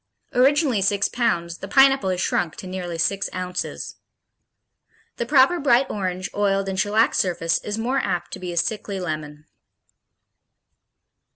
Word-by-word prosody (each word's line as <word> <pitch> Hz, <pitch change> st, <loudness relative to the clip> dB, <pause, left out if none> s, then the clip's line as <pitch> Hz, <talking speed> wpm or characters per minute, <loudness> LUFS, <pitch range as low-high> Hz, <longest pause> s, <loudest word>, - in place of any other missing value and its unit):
Originally 270 Hz, -3 st, +3 dB
six 200 Hz, +1 st, +2 dB
pounds, 175 Hz, -8 st, -1 dB
the 195 Hz, -, -7 dB
Pineapple 270 Hz, -1 st, +4 dB
has 185 Hz, -1 st, -1 dB
shrunk 170 Hz, -2 st, -1 dB
to -, -, -9 dB
nearly 180 Hz, -2 st, -5 dB
six 195 Hz, +4 st, 0 dB
ounces. 180 Hz, 0 st, -5 dB, 1.2 s
The 235 Hz, -, -3 dB
proper 275 Hz, +5 st, +4 dB
bright 270 Hz, -2 st, +3 dB
orange, 185 Hz, -2 st, -3 dB
oiled 195 Hz, -1 st, 0 dB
and 190 Hz, -1 st, -2 dB
shellacked 210 Hz, +3 st, +2 dB
surface 165 Hz, -3 st, 0 dB
is 210 Hz, +1 st, -4 dB
more 250 Hz, +4 st, 0 dB
apt 175 Hz, -6 st, -2 dB
to -, -, -6 dB
be 180 Hz, -1 st, -5 dB
a 170 Hz, -, -6 dB
sickly 205 Hz, +1 st, -2 dB
lemon. 155 Hz, -3 st, -5 dB
195 Hz, 145 wpm, -23 LUFS, 180-235 Hz, 1.2 s, Pineapple